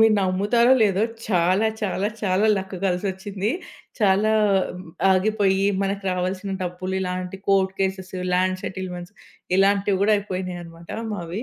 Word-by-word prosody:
మీరు 220 -1 +6
నమ్ముతారో 205 +6 +3
లేదో, 200 -1 +2 0.3
చాలా, 185 +3 +3
చాలా, 205 0 -1
చాలా 200 +1 +2
లక్ 190 0 -5
కలిసొచ్చింది. 190 +2 -2 0.5
చాలా 205 +1 +3 0.8
ఆగిపోయి, 195 0 +2 0.2
మనకు 195 0 -1
రావాల్సిన 185 +2 -2
డబ్బులు, 185 +1 -4
ఇలాంటి 180 0 -3
కోర్ట్ 190 -1 +3
కేసెస్, 190 -1 -2 0.2
లాండ్ 185 +1 +1
సెటిల్‌మెంట్స్ 180 -1 -6 0.4
ఇలాంటివి 200 0 +3
గూడా 215 +1 +4
అయిపోయినాయన్నమాట 180 -4 -6 0.2
మావి. 175 +4 -5
190 Hz, 115 wpm, -23 LUFS, 185-200 Hz, 0.8 s, మీరు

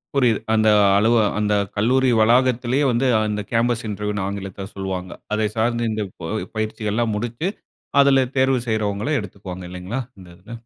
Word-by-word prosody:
புரியிது. 120 -6 +3
அந்த 110 0 +3 0.3
அலு 110 +3 +3 0.3
அந்த 105 0 +1 0.2
கல்லூரி 130 +5 +2
வளாகத்திலேயே 125 +3 +3
வந்து 125 +3 +1 0.2
அந்த 105 0 -2
கேம்பஸ் 115 0 +1
இன்டர்வியூன்னு 105 -1 -3
ஆங்கிலத்தில 100 -1 -6
சொல்வாங்க. 95 -2 -4 0.2
அதை 110 0 +1
சார்ந்து 115 0 +1
இந்த 105 -1 -2 0.2
ப 80 - -4 0.2
பயிற்சிகள்லாம் 110 +1 -1
முடிச்சு 120 - -3 0.5
அதில 135 -2 +4
தேர்வு 130 0 +3
செய்றவங்கள 110 +3 -1
எடுத்துக்குவாங்க 95 -2 -8
இல்லைங்களா? 90 +8 -4 0.2
இந்த 90 -2 -13
இதுல. 95 +6 -14
110 Hz, 140 wpm, -21 LUFS, 100-120 Hz, 0.5 s, அதில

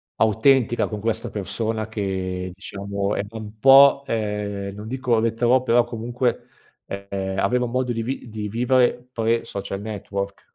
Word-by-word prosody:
autentica 120 +2 +3
con 105 -1 -5
questa 115 +1 -2
persona 110 +2 -3
che 95 -3 -3
diciamo 100 +1 -3
è - - 0
è - - -7
un 110 0 -9
po', 140 +2 +7
ehm, 105 -3 -2
non 105 +1 -8
dico 130 -2 +1
retrò, 120 +3 +2
però 120 -1 +4
comunque, 120 +1 -2 0.4
ehm, 100 -1 -4
aveva 125 +6 +1
un 120 - -5
modo 125 -1 0
di 115 - -2
vi 130 0 -4
di 105 -1 -5
vivere 125 +2 +2
pre-social 110 -4 -1
network. 100 -2 -5
110 Hz, 150 wpm, -23 LUFS, 100-120 Hz, 0.4 s, po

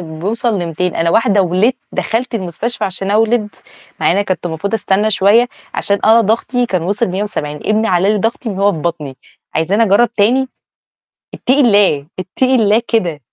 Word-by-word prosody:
بيوصل 190 +8 -3
ل200، 175 +1 -3
أنا 165 0 +1
واحدة 205 0 +3
ولدت 185 +9 +1 0.2
دخلت 235 +2 -2
المستشفى 200 +4 -3
عشان 195 +1 -3
أولد، 220 +1 +1 0.5
مع - - +2
إني 200 +2 0
كنت 185 -2 -3
المفروض 175 +6 -3
أستنى 205 0 0
شوية، 215 +5 +4 0.3
عشان 200 0 0
أنا 225 +1 +6
ضغطي 235 +3 0
كان 185 -6 -2
وصل 200 +6 -1
170، 180 -6 -4
ابني 215 +8 0
علّى 185 +3 +2
لي 210 - 0
ضغطي 225 +3 -2
من 195 -3 -5
وهو 200 +1 +3
في 165 - -5
بطني، 150 -5 -4 0.4
عايزاني 180 +8 +1
أجرّب 225 +3 +3
تاني؟ 245 +5 +1 0.9
اتقي 260 +3 0
الله، 200 - +3
اتقي 255 +8 0
الله 220 -1 +3
كده. 175 -10 -1
200 Hz, 165 wpm, -15 LUFS, 180-225 Hz, 0.9 s, أنا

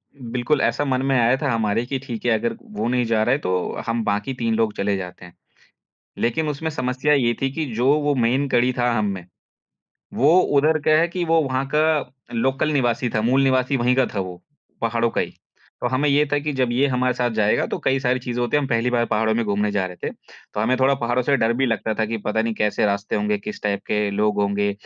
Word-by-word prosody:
बिल्कुल 125 +3 -1
ऐसा 145 - +1
मन 130 -1 0
में 135 -1 +2
आया 120 +3 +4
था 140 -4 0
हमारे 115 +1 0
की 135 +1 -3
ठीक 120 -4 -7
है, 120 - +3
अगर 115 +1 0
वो 105 +2 -4
नहीं 125 -1 +1
जा 110 -1 +1
रहा 120 - +1
है - - +2
तो 95 - -3 0.4
हम 115 0 0
बाकी 105 +5 -1
3 115 -2 -1
लोग 110 -2 +1
चले 100 0 0
जाते 90 -1 -8
हैं। 90 - -15 0.9
लेकिन 150 +7 0
उसमे 160 +2 -3
समस्या 130 +1 0
ये 120 -4 +2
थी 135 - +1
की 160 -1 -3
जो 120 +3 0
वो 145 -1 +1
मेन 130 +3 +1
कड़ी 125 0 +2
था 120 0 +2
हम 110 -3 0
में, 90 -2 -9 0.9
वो 155 +8 +5
उधर 155 +2 +2
क्या 155 +1 +4
है 170 - +2
कि 175 0 -3
वो 165 0 +3
वहाँ 135 0 -1
का 155 -3 +2 0.2
लोकल 135 +6 0
निवासी 120 -3 +1
था, 110 - +1
मूल 130 +4 +3
निवासी 130 +1 +2
वही 125 +1 +2
का 130 -1 +3
था 100 - -1
वो, 90 -1 -7 0.4
पहाड़ों 115 0 0
का - - -1
ही। - - -4 0.5
तो 125 - 0
हमें 140 +3 +1
ये 145 +1 +4
था 145 - +3
की 150 +1 -3
जब 130 -2 +2
ये 135 +4 +3
हमारे 125 -1 0
साथ 120 -1 0
जाएगा 105 -1 +2
तो - - -4
कई 135 0 +2
सारी 130 0 +1
चीज़े 120 0 -4
होती 120 +4 +1
है, - - +3
हम 135 - -2
पहली 115 +1 +1
बार 120 -1 +2
पहाड़ों 110 0 +1
में 115 0 0
घूमने 105 0 0
जा 100 -2 0
रहे 90 -1 -9
थे, - - -4 0.4
तो 105 - -1
हमें 125 +4 +2
थोड़ा 135 +1 +4
पहाड़ों 120 0 0
से 140 +2 +2
डर 115 -1 +2
भी 135 +2 +1
लगता 110 -1 -1
था 110 - 0
की 115 +1 -3
पता 110 +1 +1
नहीं 115 -1 -2
कैसे 105 0 0
रास्ते 100 +1 -1
होंगे, 105 0 0
किस 105 - -7
टाइप 100 -1 -1
के 105 -1 0
लोग 105 0 0
होंगे, 100 0 0
120 Hz, 245 wpm, -22 LUFS, 110-135 Hz, 0.9 s, वो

